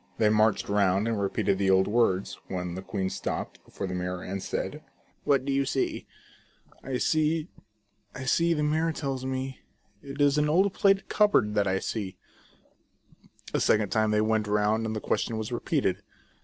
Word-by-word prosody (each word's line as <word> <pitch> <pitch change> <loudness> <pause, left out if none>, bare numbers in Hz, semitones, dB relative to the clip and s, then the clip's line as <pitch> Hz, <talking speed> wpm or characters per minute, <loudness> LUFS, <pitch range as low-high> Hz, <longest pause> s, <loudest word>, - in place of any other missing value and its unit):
They 110 - +3
marched 110 0 +2
round 100 0 +2
and 110 -3 -1
repeated 95 -1 0
the 95 -1 +2
old 95 0 +4
words,, 105 -4 +1
when 90 -2 -4
the 95 - -5
queen 95 0 -3
stopped - - -4
before 100 - -6
the 90 - -4
mirror, 90 0 -3
and 95 +1 -4
said: - - -4 0.2
" - - -38
What 135 -2 +2
do 140 - 0
you 140 0 +2
see 135 0 -2 0.3
?" - - -30
" - - -29
I 130 -1 -2
see, 155 +4 +1 0.7
I 130 - -6
see, 170 +5 +2
the 150 - 0
mirror 160 +2 +1
tells 135 -4 -3
me, 130 0 -4 0.4
It 140 +1 -9
is 145 0 +4
an 150 0 +2
old 190 +5 +3
plate 195 -1 +3
cupboard 205 - +3
that 105 -1 +1
I 95 0 +1
see." 95 -2 -4 1.4
A - - +2
second 105 -2 +2
time 110 +1 +2
they 105 0 +2
went 110 -1 +1
round, 105 +2 +1
and 110 - -3
the - - -2
question 115 - -1
was 110 +2 -4
repeated. 120 - -1
110 Hz, 190 wpm, -27 LUFS, 100-140 Hz, 1.4 s, old